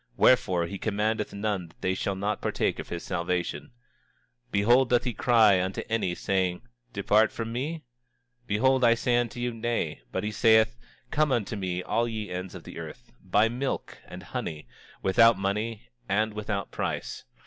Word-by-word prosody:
Wherefore, 95 Hz, -9 st, +4 dB
he 95 Hz, +3 st, -6 dB
commandeth 110 Hz, +1 st, -1 dB
none 100 Hz, -3 st, -2 dB
that 80 Hz, -, -23 dB
they 95 Hz, -, +1 dB
shall 95 Hz, +1 st, -2 dB
not 100 Hz, +2 st, -2 dB
partake -, -, -1 dB
of -, -, -7 dB
his 85 Hz, -, -5 dB
salvation. 90 Hz, -1 st, -2 dB, 0.8 s
26:25 -, -, -36 dB
Behold, 120 Hz, +6 st, +4 dB
doth 120 Hz, -1 st, +3 dB
he 125 Hz, -, -2 dB
cry 110 Hz, -7 st, +4 dB
unto 95 Hz, +1 st, -3 dB
any, 110 Hz, -6 st, 0 dB
saying: 95 Hz, -2 st, -1 dB, 0.3 s
Depart 110 Hz, +2 st, +3 dB
from 115 Hz, 0 st, -5 dB
me? 150 Hz, +6 st, -3 dB, 0.6 s
Behold, 130 Hz, +5 st, +2 dB
I 115 Hz, -1 st, +6 dB
say 120 Hz, +1 st, +1 dB
unto 120 Hz, -1 st, -1 dB
you, 120 Hz, 0 st, -1 dB
Nay; 115 Hz, -, -2 dB
but 95 Hz, -, -2 dB
he 105 Hz, -, -2 dB
saith: 110 Hz, +1 st, +4 dB, 0.4 s
Come 155 Hz, -1 st, +2 dB
unto 115 Hz, -3 st, 0 dB
me 90 Hz, -2 st, -3 dB
all 115 Hz, +5 st, 0 dB
ye 110 Hz, -2 st, -5 dB
ends 90 Hz, 0 st, -5 dB
of -, -, -9 dB
the -, -, -9 dB
earth, -, -, -10 dB
buy 105 Hz, +2 st, +3 dB
milk 125 Hz, +4 st, -3 dB
and -, -, -9 dB
honey, 75 Hz, -5 st, -5 dB, 0.4 s
without 115 Hz, +4 st, +5 dB
money 100 Hz, -, -2 dB, 0.2 s
and 110 Hz, +2 st, +1 dB
without 105 Hz, -2 st, -3 dB
price. -, -, -3 dB
105 Hz, 170 wpm, -27 LUFS, 95-115 Hz, 0.8 s, I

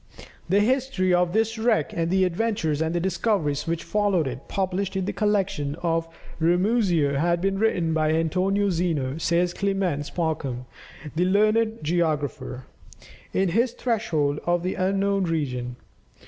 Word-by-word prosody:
The 200 Hz, +3 st, +4 dB
history 245 Hz, -6 st, +1 dB
of 175 Hz, -1 st, +2 dB
this 225 Hz, +2 st, 0 dB
wreck, 220 Hz, -10 st, +1 dB
and 165 Hz, -1 st, -1 dB
the 190 Hz, +1 st, +3 dB
adventures 180 Hz, -5 st, -1 dB
and 160 Hz, +2 st, 0 dB
discoveries 175 Hz, -6 st, 0 dB
which 165 Hz, 0 st, -2 dB
followed 205 Hz, -6 st, +1 dB
it, 130 Hz, 0 st, -6 dB
published 195 Hz, 0 st, -2 dB
in 190 Hz, -1 st, -1 dB
the -, -, -2 dB
collection 195 Hz, -9 st, 0 dB
of 165 Hz, -1 st, 0 dB, 0.3 s
Ramusio 175 Hz, -4 st, +2 dB
had 170 Hz, +2 st, +2 dB
been 195 Hz, +2 st, 0 dB
written 180 Hz, -7 st, +1 dB
by 155 Hz, -1 st, +1 dB
Antonio 185 Hz, +5 st, +1 dB
Zeno, 160 Hz, -5 st, -1 dB
says 175 Hz, +2 st, +1 dB
Clements 190 Hz, -8 st, -1 dB
Markham, 140 Hz, -7 st, -2 dB, 0.5 s
the 175 Hz, +3 st, +2 dB
learned 215 Hz, +2 st, +2 dB
geographer, 150 Hz, -6 st, -1 dB, 0.7 s
in 190 Hz, -1 st, +1 dB
his 230 Hz, +7 st, +1 dB
"Threshold 165 Hz, -, 0 dB
of 175 Hz, 0 st, +1 dB
the 185 Hz, -, -1 dB
Unknown 195 Hz, +1 st, +1 dB
Region." 125 Hz, -7 st, -2 dB
180 Hz, 140 wpm, -25 LUFS, 160-200 Hz, 0.7 s, The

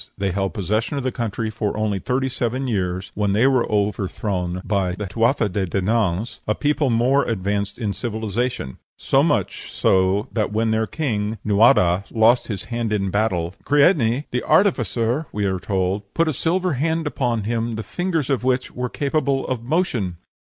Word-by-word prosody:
They 100 Hz, -1 st, -1 dB
held 95 Hz, +3 st, -2 dB
possession 110 Hz, -, -1 dB
of 140 Hz, -, -2 dB
the 130 Hz, -, 0 dB
country 115 Hz, -1 st, -3 dB
for 105 Hz, -1 st, -2 dB
only 105 Hz, -2 st, 0 dB
thirty 130 Hz, +5 st, -1 dB
seven 130 Hz, +1 st, -2 dB
years, 95 Hz, -5 st, -2 dB
when 105 Hz, -1 st, 0 dB
they 110 Hz, +5 st, +3 dB
were 130 Hz, -4 st, +2 dB
overthrown 95 Hz, -3 st, -1 dB
by 95 Hz, -4 st, 0 dB
the 105 Hz, +3 st, -4 dB
Tuatha 115 Hz, +4 st, +1 dB
de 95 Hz, 0 st, -2 dB
Dananns, 100 Hz, +2 st, 0 dB
a 105 Hz, -, +1 dB
people 145 Hz, -1 st, +1 dB
more 125 Hz, +4 st, +3 dB
advanced 100 Hz, -2 st, -2 dB
in 105 Hz, -5 st, -2 dB
civilization; 110 Hz, -, -3 dB, 0.2 s
so -, -, +2 dB
much -, -, -1 dB
so 95 Hz, +4 st, +2 dB
that 110 Hz, -3 st, 0 dB
when 110 Hz, +1 st, +1 dB
their 110 Hz, 0 st, +1 dB
king, 110 Hz, -8 st, -2 dB
Nuadha, 100 Hz, -4 st, +4 dB
lost 115 Hz, +2 st, +3 dB
his 100 Hz, -5 st, -4 dB
hand 115 Hz, -2 st, -3 dB
in 100 Hz, -3 st, 0 dB
battle, 90 Hz, -5 st, 0 dB
"Creidne, 140 Hz, -4 st, +3 dB
the 125 Hz, -, 0 dB
artificer," 145 Hz, -, +2 dB
we 105 Hz, -1 st, -1 dB
are 95 Hz, -1 st, 0 dB
told, 95 Hz, +1 st, -2 dB
"put 165 Hz, 0 st, +2 dB
a 155 Hz, -, +1 dB
silver 175 Hz, +5 st, 0 dB
hand 160 Hz, +4 st, 0 dB
upon 120 Hz, -6 st, -1 dB
him, 115 Hz, +1 st, -1 dB
the 110 Hz, -, -4 dB
fingers 165 Hz, -4 st, -2 dB
of 130 Hz, -3 st, 0 dB
which 130 Hz, 0 st, 0 dB
were 125 Hz, 0 st, -3 dB
capable 140 Hz, -1 st, 0 dB
of 125 Hz, -3 st, -2 dB
motion." 120 Hz, -, -1 dB
110 Hz, 175 wpm, -22 LUFS, 100-130 Hz, 0.2 s, Nuadha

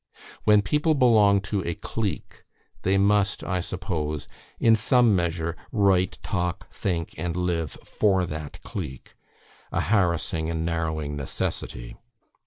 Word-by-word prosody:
When 105 Hz, -1 st, +6 dB
people 150 Hz, -, +2 dB
belong 110 Hz, -7 st, +5 dB
to 100 Hz, -1 st, -2 dB
a 85 Hz, 0 st, -2 dB
clique, 110 Hz, -4 st, -4 dB, 0.4 s
they 95 Hz, +1 st, +2 dB
must, 100 Hz, 0 st, +2 dB
I 95 Hz, -1 st, -1 dB
suppose, 80 Hz, -5 st, -3 dB, 0.3 s
in 115 Hz, -1 st, +5 dB
some 115 Hz, 0 st, +4 dB
measure, 85 Hz, -1 st, -1 dB, 0.2 s
write, 95 Hz, -3 st, +2 dB
talk, 90 Hz, -4 st, -3 dB
think, 85 Hz, -4 st, -2 dB
and 85 Hz, +1 st, -2 dB
live 85 Hz, -3 st, -1 dB
for 95 Hz, -4 st, +2 dB
that 80 Hz, -2 st, -7 dB
clique; 75 Hz, -10 st, -7 dB, 0.6 s
a -, -, 0 dB
harassing 85 Hz, -4 st, +1 dB
and 80 Hz, -1 st, -2 dB
narrowing 80 Hz, -3 st, -2 dB
necessity. -, -, -4 dB
90 Hz, 125 wpm, -25 LUFS, 80-100 Hz, 0.6 s, When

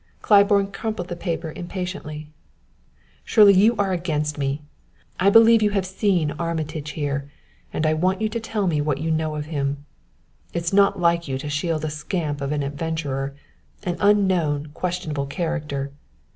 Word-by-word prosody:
Claiborne 200 Hz, -1 st, +4 dB
crumpled 200 Hz, -4 st, -4 dB
the 175 Hz, -, -3 dB
paper 170 Hz, -2 st, -3 dB
impatiently. 175 Hz, -4 st, -6 dB, 0.9 s
"Shirley, 205 Hz, -2 st, +6 dB
you 210 Hz, +5 st, +5 dB
are 200 Hz, -3 st, 0 dB
against 150 Hz, -4 st, -1 dB
me! 140 Hz, +1 st, -2 dB, 0.6 s
I 195 Hz, -, +5 dB
believe 225 Hz, +1 st, +7 dB
you 210 Hz, -, +3 dB
have 190 Hz, -, 0 dB
seen 185 Hz, -5 st, +1 dB
Armitage 155 Hz, -3 st, -3 dB
here, 140 Hz, -2 st, -3 dB, 0.4 s
and 155 Hz, -, -1 dB
I 155 Hz, -, +3 dB
want 185 Hz, +4 st, +1 dB
you 220 Hz, -, +1 dB
to 230 Hz, +2 st, -3 dB
tell 220 Hz, -2 st, -2 dB
me 155 Hz, -5 st, +1 dB
what 145 Hz, -2 st, 0 dB
you 160 Hz, +3 st, -2 dB
know 155 Hz, -1 st, -1 dB
of 150 Hz, -1 st, -4 dB
him. 145 Hz, -2 st, -3 dB, 0.7 s
It 170 Hz, -, -1 dB
is 170 Hz, -, -2 dB
not 200 Hz, -1 st, +4 dB
like 170 Hz, -1 st, +2 dB
you 135 Hz, -1 st, -2 dB
to 145 Hz, +2 st, -5 dB
shield 155 Hz, +1 st, -1 dB
a 155 Hz, -, -2 dB
scamp 150 Hz, -1 st, -3 dB
of 140 Hz, +1 st, -2 dB
an 150 Hz, -1 st, 0 dB
adventurer 140 Hz, -2 st, -3 dB, 0.5 s
an 175 Hz, -3 st, -1 dB
unknown, 185 Hz, -8 st, +2 dB
questionable 165 Hz, -6 st, -3 dB
character. 150 Hz, -3 st, -3 dB
165 Hz, 165 wpm, -23 LUFS, 150-190 Hz, 0.9 s, believe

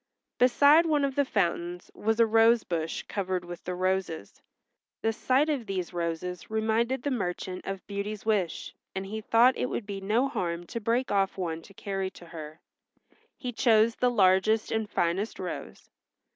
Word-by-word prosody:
Beside 285 Hz, +6 st, +6 dB
one 295 Hz, -3 st, +2 dB
of 275 Hz, -, -2 dB
the 285 Hz, -, +2 dB
fountains 175 Hz, -5 st, -1 dB
was 220 Hz, +2 st, -1 dB
a 230 Hz, -, +7 dB
rose 225 Hz, +1 st, +4 dB
bush 165 Hz, -2 st, -3 dB
covered 185 Hz, -3 st, -3 dB
with 175 Hz, -1 st, -8 dB
the 180 Hz, -, -3 dB
roses. 185 Hz, -, -2 dB, 0.6 s
The 225 Hz, -, +2 dB
sight 260 Hz, +6 st, +2 dB
of 275 Hz, -7 st, -2 dB
these 185 Hz, -2 st, -3 dB
roses 170 Hz, +1 st, -3 dB
reminded 225 Hz, +4 st, 0 dB
the 285 Hz, -, -1 dB
merchant 185 Hz, -5 st, -3 dB
of 195 Hz, -1 st, -5 dB
Beauty's 200 Hz, +1 st, -5 dB
wish, 200 Hz, -7 st, -1 dB, 0.2 s
and 190 Hz, 0 st, -3 dB
he 215 Hz, +3 st, -5 dB
thought 235 Hz, +4 st, +5 dB
it -, -, -1 dB
would 225 Hz, -, -3 dB
be 200 Hz, -1 st, -5 dB
no 220 Hz, +7 st, +2 dB
harm 175 Hz, -9 st, -3 dB
to 230 Hz, -, -5 dB
break 235 Hz, +4 st, 0 dB
off 195 Hz, -1 st, +1 dB
one 165 Hz, -3 st, -3 dB
to 195 Hz, +4 st, -17 dB
carry 195 Hz, -1 st, -3 dB
to 175 Hz, -, -14 dB
her. 155 Hz, -1 st, -9 dB, 0.8 s
He 250 Hz, -3 st, -4 dB
chose 225 Hz, -1 st, +4 dB
the 250 Hz, -, +1 dB
largest 210 Hz, 0 st, +3 dB
and 220 Hz, -2 st, -1 dB
finest 190 Hz, +3 st, -1 dB
rose. -, -, -7 dB
205 Hz, 170 wpm, -28 LUFS, 180-230 Hz, 0.8 s, a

